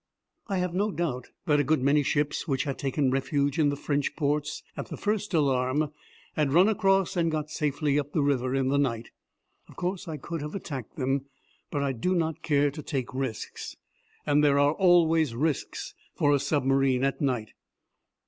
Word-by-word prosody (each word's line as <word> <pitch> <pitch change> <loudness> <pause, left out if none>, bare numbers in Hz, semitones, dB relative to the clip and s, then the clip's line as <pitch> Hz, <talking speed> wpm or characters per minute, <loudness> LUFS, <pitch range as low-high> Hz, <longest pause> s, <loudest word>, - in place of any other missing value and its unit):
I 195 -3 -1
have 180 -1 -1
no 205 +4 +1
doubt 160 - -3 0.2
that 150 -1 +3
a - - +3
good 145 -1 +1
many 145 +2 +4
ships 145 +3 0
which 135 -3 0
had 140 -2 -4
taken 135 -1 0
refuge 140 +2 0
in 150 -2 +4
the 145 - -1
French 145 0 -1
ports 150 -1 -1
at - - -5
the - - -7
first 210 0 -1
alarm 140 -1 +1 0.4
had 145 -3 +1
run 180 +5 +6
across 195 -4 +2
and 170 -2 +2
got 155 -1 -3
safely 150 -1 0
up 145 0 -4
the 155 - +1
river 130 -2 +1
in 135 -1 +1
the 140 +1 +2
night. 120 -5 -1 0.6
Of - - -14
course 185 +1 -3
I 160 -2 -4
could 165 +3 -5
have 150 +4 -5
attacked 140 - -6
them, 135 0 -1 0.4
but 145 - -1
I 140 - +1
do 155 +10 -1
not 160 -3 -1
care 145 -1 +2
to 150 +2 -7
take 135 -5 -3
risks 130 -4 -5 0.5
and 145 0 +3
there 140 -1 +4
are 145 +1 +4
always 165 -7 +4
risks 150 +3 -2 0.2
for 145 0 +3
a 140 - +3
submarine 135 -2 +2
at 135 +4 0
night. 125 -6 -1
145 Hz, 190 wpm, -27 LUFS, 135-160 Hz, 0.6 s, run